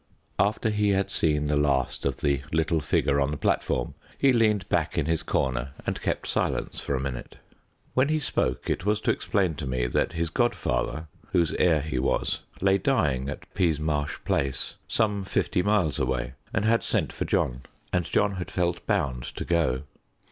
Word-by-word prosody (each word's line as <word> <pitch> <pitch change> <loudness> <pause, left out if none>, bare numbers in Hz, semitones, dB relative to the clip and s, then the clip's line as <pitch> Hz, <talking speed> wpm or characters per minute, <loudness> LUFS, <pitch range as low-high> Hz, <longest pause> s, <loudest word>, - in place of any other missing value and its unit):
After 105 +2 +2
he 105 -1 +2
had 95 0 +1
seen 75 -2 +1
the 75 0 +1
last 70 -3 +1
of 70 - -3
the 70 -2 +1
little 80 0 +2
figure 70 -1 +1
on 70 - +2
the 75 - -3
platform 60 -2 0 0.2
he 135 -2 +4
leaned 110 -4 +2
back - - 0
in - - +2
his 80 0 +1
corner 65 +1 -1
and - - -2
kept - - -1
silence - - -1
for 70 - -2
a - - -1
minute. 65 -2 -5 0.6
When 130 +3 +3
he 155 0 +2
spoke 65 - -1
it - - -1
was 105 +2 +2
to - - +2
explain 95 -5 0
to 70 - -4
me 65 -1 0
that - - 0
his 85 -1 -1
godfather, 80 - 0 0.3
whose 85 -3 +3
heir 80 -4 +4
he 70 -4 -2
was, 65 - 0 0.2
lay 95 0 +4
dying 70 - +1
at - - -6
Peasmarsh 75 -4 0
Place, 70 -2 -1
some 105 -3 +1
fifty 90 - 0
miles 100 -8 +2
away, 65 -1 -1 0.2
and 105 - 0
had 115 +1 +4
sent - - -1
for - - -3
John, 60 +1 0 0.3
and 90 -1 +2
John 100 +3 +1
had 90 - -4
felt 85 -1 -1
bound 70 - 0
to - - -4
go. 80 -6 +1
80 Hz, 185 wpm, -27 LUFS, 70-100 Hz, 0.6 s, he